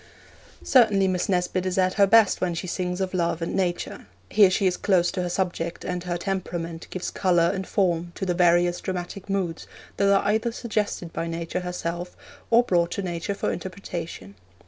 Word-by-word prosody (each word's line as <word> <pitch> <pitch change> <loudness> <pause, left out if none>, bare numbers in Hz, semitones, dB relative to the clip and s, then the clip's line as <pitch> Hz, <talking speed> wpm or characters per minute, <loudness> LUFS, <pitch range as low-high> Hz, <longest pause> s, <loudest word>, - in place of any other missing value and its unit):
Certainly 210 -7 +4
Miss 180 0 -1
Nesbit 180 0 0
is 185 0 -2
at 185 -1 +3
her 200 -1 +4
best 220 -1 +5
when 175 -2 0
she 165 - -4
sings 180 +1 -2
of 190 0 -2
love 170 -2 0
and 165 - -3
nature. 180 -2 -2 0.2
Here 205 -3 +6
she 190 +1 +1
is 180 -1 +3
close 180 -3 +2
to 185 - -2
her 180 - -2
subject, 175 -2 -2
and 180 0 -3
her 175 -1 -1
temperament 170 -3 -4
gives 185 - -4
colour 175 -3 +2
and 190 -1 -4
form 175 -3 0
to - - -3
the 180 - +1
various 175 0 +3
dramatic 185 +1 -5
moods 185 -4 -2 0.3
that 200 0 +3
are 195 - +3
either 220 +3 +1
suggested 210 -7 -3
by 165 - -3
Nature 165 0 -3
herself 180 -1 -4 0.3
or 235 +1 +6
brought 170 -6 +2
to 200 - -3
Nature 175 +2 -3
for - - -1
interpretation. 170 - -6
180 Hz, 190 wpm, -25 LUFS, 175-195 Hz, 0.3 s, Here